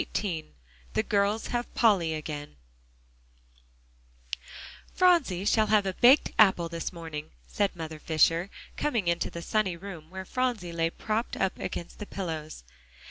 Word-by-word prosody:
XVIII 165 Hz, -, -4 dB, 0.4 s
THE -, -, +1 dB
GIRLS 205 Hz, +2 st, +1 dB
HAVE 240 Hz, 0 st, -2 dB
POLLY 185 Hz, -9 st, +3 dB
AGAIN 150 Hz, -, -6 dB, 2.4 s
"Phronsie 330 Hz, -, +3 dB
shall 215 Hz, +1 st, +3 dB
have 210 Hz, -2 st, +4 dB
a 190 Hz, -, -1 dB
baked 255 Hz, +8 st, +6 dB
apple 190 Hz, -5 st, +5 dB
this 165 Hz, 0 st, -4 dB
morning," 160 Hz, -4 st, -7 dB, 0.2 s
said 200 Hz, -, -1 dB
Mother 160 Hz, -2 st, -6 dB
Fisher, 165 Hz, +4 st, +2 dB, 0.3 s
coming 235 Hz, -11 st, 0 dB
into 170 Hz, 0 st, +1 dB
the 170 Hz, -, -7 dB
sunny 195 Hz, -4 st, 0 dB
room 170 Hz, -4 st, -9 dB
where 190 Hz, +1 st, -7 dB
Phronsie 240 Hz, -8 st, -1 dB
lay 165 Hz, 0 st, +1 dB
propped 220 Hz, +6 st, -2 dB
up 190 Hz, -, 0 dB
against 170 Hz, -, -5 dB
the 210 Hz, -, -6 dB
pillows. 160 Hz, -, -5 dB
185 Hz, 135 wpm, -28 LUFS, 165-215 Hz, 2.4 s, baked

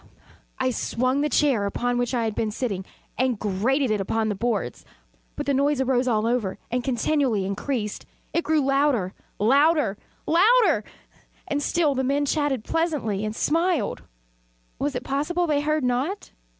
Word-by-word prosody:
I 260 Hz, 0 st, +1 dB
swung 255 Hz, +3 st, 0 dB
the 300 Hz, -, +1 dB
chair 255 Hz, -7 st, +2 dB
upon 245 Hz, +4 st, -1 dB
which 245 Hz, +1 st, -1 dB
I 235 Hz, -, +1 dB
had 220 Hz, -1 st, -1 dB
been 220 Hz, +1 st, -1 dB
sitting, 205 Hz, -4 st, -3 dB, 0.3 s
and 255 Hz, -3 st, +1 dB
grated 225 Hz, +7 st, 0 dB
it 210 Hz, -2 st, +1 dB
upon 220 Hz, +3 st, 0 dB
the -, -, 0 dB
boards, 205 Hz, -, -2 dB, 0.5 s
but -, -, -4 dB
the 280 Hz, -, +1 dB
noise 280 Hz, +1 st, +2 dB
arose 260 Hz, -1 st, +1 dB
over 225 Hz, -2 st, +1 dB
all -, -, -18 dB
and 250 Hz, 0 st, 0 dB
continually 250 Hz, -4 st, +1 dB
increased. 210 Hz, +2 st, -3 dB, 0.3 s
It 335 Hz, -, +1 dB
grew 315 Hz, -1 st, +2 dB
louder 275 Hz, -8 st, +1 dB, 0.2 s
louder 275 Hz, -1 st, +3 dB, 0.3 s
louder! 365 Hz, -, +4 dB, 0.6 s
And 290 Hz, 0 st, -1 dB
still 305 Hz, -1 st, +1 dB
the 265 Hz, 0 st, -1 dB
men 280 Hz, +2 st, +1 dB
chatted 285 Hz, -5 st, 0 dB
pleasantly, 300 Hz, -, -1 dB
and 215 Hz, 0 st, -3 dB
smiled. 330 Hz, -, 0 dB, 0.8 s
Was 280 Hz, -1 st, -1 dB
it 250 Hz, -, -3 dB
possible 300 Hz, +7 st, 0 dB
they 295 Hz, -3 st, +1 dB
heard 305 Hz, 0 st, 0 dB
not? 260 Hz, +11 st, -1 dB
260 Hz, 160 wpm, -24 LUFS, 220-295 Hz, 0.8 s, louder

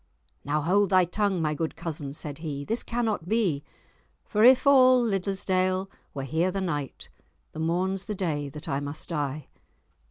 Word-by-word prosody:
"Now 150 Hz, +2 st, 0 dB
hold 195 Hz, +5 st, +2 dB
thy 185 Hz, -1 st, +5 dB
tongue, 190 Hz, -1 st, 0 dB
my 155 Hz, -1 st, +1 dB
good 160 Hz, +1 st, -3 dB
cousin," 160 Hz, -4 st, -5 dB
said 150 Hz, -1 st, -6 dB
he. 145 Hz, -3 st, -5 dB
"This 225 Hz, +7 st, -1 dB
cannot 225 Hz, -7 st, -2 dB
be— 190 Hz, -11 st, +1 dB, 0.6 s
'For 215 Hz, 0 st, +1 dB
if 255 Hz, +2 st, +7 dB
all 255 Hz, -2 st, +7 dB
Liddesdale 190 Hz, -3 st, 0 dB, 0.2 s
were 135 Hz, -, -3 dB
here 160 Hz, +7 st, 0 dB
the 195 Hz, +1 st, -2 dB
night, 150 Hz, -7 st, -4 dB, 0.4 s
The 160 Hz, -, -8 dB
morn's 185 Hz, +4 st, -1 dB
the 210 Hz, -, -4 dB
day 150 Hz, -7 st, -2 dB
that 150 Hz, +2 st, -9 dB
I 135 Hz, -, -1 dB
must 145 Hz, +1 st, -5 dB
die. 150 Hz, -3 st, -3 dB
175 Hz, 165 wpm, -27 LUFS, 150-200 Hz, 0.6 s, if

